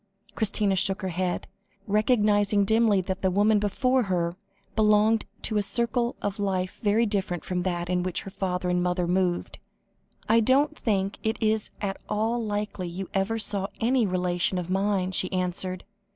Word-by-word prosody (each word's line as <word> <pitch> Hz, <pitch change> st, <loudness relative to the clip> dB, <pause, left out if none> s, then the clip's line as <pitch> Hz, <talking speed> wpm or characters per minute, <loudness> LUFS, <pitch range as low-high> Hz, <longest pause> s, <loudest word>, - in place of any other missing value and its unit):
Christina 205 Hz, -2 st, +1 dB
shook 195 Hz, +1 st, +1 dB
her 190 Hz, -, -1 dB
head, 180 Hz, 0 st, -2 dB, 0.4 s
recognising 210 Hz, -1 st, +3 dB
dimly 220 Hz, -2 st, +3 dB
that 190 Hz, +1 st, -4 dB
the 190 Hz, -, +2 dB
woman 205 Hz, +3 st, +3 dB
before 255 Hz, +6 st, +1 dB
her, 175 Hz, -5 st, -1 dB, 0.4 s
belonged 215 Hz, 0 st, +3 dB, 0.2 s
to 215 Hz, -, -1 dB
a -, -, +3 dB
circle 235 Hz, +3 st, -1 dB
of 205 Hz, +1 st, -2 dB
life 185 Hz, -2 st, -2 dB
very 220 Hz, +2 st, +3 dB
different 190 Hz, -5 st, -2 dB
from 180 Hz, -1 st, -1 dB
that 175 Hz, -1 st, -2 dB
in 180 Hz, 0 st, 0 dB
which 180 Hz, -1 st, -2 dB
her 195 Hz, -, -8 dB
father 185 Hz, -2 st, -2 dB
and 180 Hz, 0 st, +1 dB
mother 180 Hz, 0 st, 0 dB
had 170 Hz, -, -1 dB
moved. 180 Hz, -2 st, -1 dB, 0.7 s
"I 225 Hz, +1 st, +5 dB
don't 275 Hz, +6 st, +3 dB
think 200 Hz, -7 st, -1 dB
it 220 Hz, +1 st, -1 dB
is 220 Hz, -1 st, 0 dB
at 195 Hz, -1 st, -2 dB
all 225 Hz, +3 st, 0 dB
likely 205 Hz, -3 st, -3 dB
you 180 Hz, +2 st, -6 dB
ever 195 Hz, +3 st, 0 dB
saw 200 Hz, -3 st, 0 dB
any 235 Hz, -1 st, +2 dB
relation 180 Hz, 0 st, 0 dB
of 180 Hz, 0 st, -4 dB
mine," 190 Hz, -1 st, +1 dB
she 185 Hz, 0 st, +1 dB
answered. 185 Hz, 0 st, -2 dB
200 Hz, 170 wpm, -26 LUFS, 185-215 Hz, 0.7 s, I